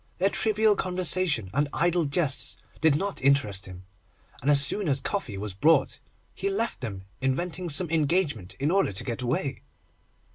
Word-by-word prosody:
Their 195 Hz, +2 st, +2 dB
trivial 215 Hz, -1 st, +3 dB
conversation 180 Hz, -, +1 dB
and 145 Hz, +2 st, +1 dB
idle 175 Hz, 0 st, +1 dB
jests 140 Hz, -1 st, +1 dB, 0.2 s
did 160 Hz, -3 st, +4 dB
not 195 Hz, +5 st, -2 dB
interest 130 Hz, -9 st, +1 dB
him, 90 Hz, 0 st, -11 dB, 0.6 s
and 140 Hz, -, -1 dB
as 140 Hz, -1 st, +4 dB
soon 200 Hz, +6 st, -1 dB
as 135 Hz, -1 st, +2 dB
coffee 135 Hz, -, -3 dB
was 100 Hz, -1 st, -5 dB
brought 155 Hz, -, +2 dB, 0.3 s
he 395 Hz, -, -2 dB
left 235 Hz, -, -2 dB
them, 100 Hz, -6 st, -6 dB, 0.2 s
inventing 170 Hz, +7 st, -2 dB
some 165 Hz, +4 st, +1 dB
engagement 150 Hz, -, 0 dB
in 145 Hz, +7 st, -1 dB
order 195 Hz, -, +2 dB
to 95 Hz, -, -1 dB
get 120 Hz, -1 st, -4 dB
away. 130 Hz, +2 st, -2 dB
145 Hz, 160 wpm, -26 LUFS, 125-180 Hz, 0.6 s, did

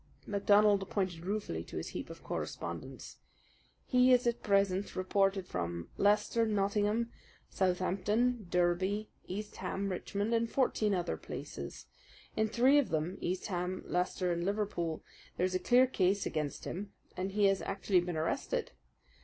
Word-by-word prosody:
MacDonald 205 Hz, -1 st, +4 dB
pointed 180 Hz, -4 st, -2 dB
ruefully 210 Hz, +1 st, -2 dB
to -, -, -7 dB
his -, -, -4 dB
heap -, -, -6 dB
of -, -, -10 dB
correspondence. -, -, -5 dB, 0.7 s
"He 250 Hz, 0 st, +5 dB
is 250 Hz, -1 st, +5 dB
at 235 Hz, 0 st, 0 dB
present 195 Hz, -1 st, +1 dB
reported 195 Hz, 0 st, +1 dB
from 85 Hz, -1 st, -4 dB
Leicester, 210 Hz, +3 st, +3 dB
Nottingham, 210 Hz, +2 st, +1 dB, 0.4 s
Southampton, 200 Hz, +5 st, +1 dB
Derby, 185 Hz, +4 st, +1 dB, 0.2 s
East 205 Hz, +3 st, -5 dB
Ham, 195 Hz, +1 st, -2 dB
Richmond, 200 Hz, +4 st, -2 dB
and 230 Hz, 0 st, +2 dB
fourteen 215 Hz, -6 st, +2 dB
other 175 Hz, -1 st, -1 dB
places. -, -, -7 dB, 0.5 s
In 220 Hz, 0 st, +2 dB
three 255 Hz, +6 st, +5 dB
of 285 Hz, -, 0 dB
them 160 Hz, +4 st, -1 dB
East 185 Hz, +1 st, -2 dB
Ham, 180 Hz, -1 st, -2 dB
Leicester, 180 Hz, 0 st, 0 dB
and 170 Hz, 0 st, -1 dB
Liverpool 195 Hz, -5 st, -1 dB, 0.3 s
there 180 Hz, -, +2 dB
is 185 Hz, -, -1 dB
a 185 Hz, -, +1 dB
clear 245 Hz, +7 st, +5 dB
case 195 Hz, -5 st, +1 dB
against 150 Hz, -3 st, -3 dB
him, 200 Hz, +3 st, -5 dB, 0.2 s
and 190 Hz, +1 st, -3 dB
he 205 Hz, 0 st, +3 dB
has 195 Hz, -1 st, +3 dB
actually 195 Hz, -2 st, +1 dB
been 175 Hz, -2 st, -3 dB
arrested. 160 Hz, +1 st, -1 dB
195 Hz, 145 wpm, -33 LUFS, 180-210 Hz, 0.7 s, He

